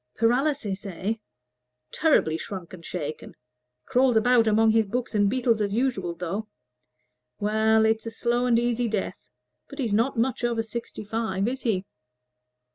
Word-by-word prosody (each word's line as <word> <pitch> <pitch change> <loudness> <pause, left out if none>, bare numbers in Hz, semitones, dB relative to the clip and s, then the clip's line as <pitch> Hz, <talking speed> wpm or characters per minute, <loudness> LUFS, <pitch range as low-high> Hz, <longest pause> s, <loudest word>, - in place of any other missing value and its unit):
Paralysis, 235 -3 +1
eh? 190 +3 -2 0.8
Terribly 300 - +3
shrunk 185 +1 -7
and 175 -2 -10
shaken 155 -3 -6 0.5
crawls 250 -2 +3
about 235 0 +4
among 220 +1 +4
his 220 -1 +3
books 245 +4 -3
and 205 -2 +3
beetles 235 -2 +1
as 200 0 0
usual, 210 -9 0
though. 180 +5 -4 0.9
Well, 220 +1 +3
it's 220 +1 +1
a - - -1
slow 240 +2 0
and 235 -2 +4
easy 240 0 +1
death. 210 -3 -4 0.4
But - - -10
he's 240 -7 -1
not 230 +4 +1
much 245 +1 0
over 235 -2 +1
sixty 225 0 -6
five, 210 -2 -1
is 260 +2 -3
he?" 200 -5 0
225 Hz, 150 wpm, -26 LUFS, 200-240 Hz, 0.9 s, about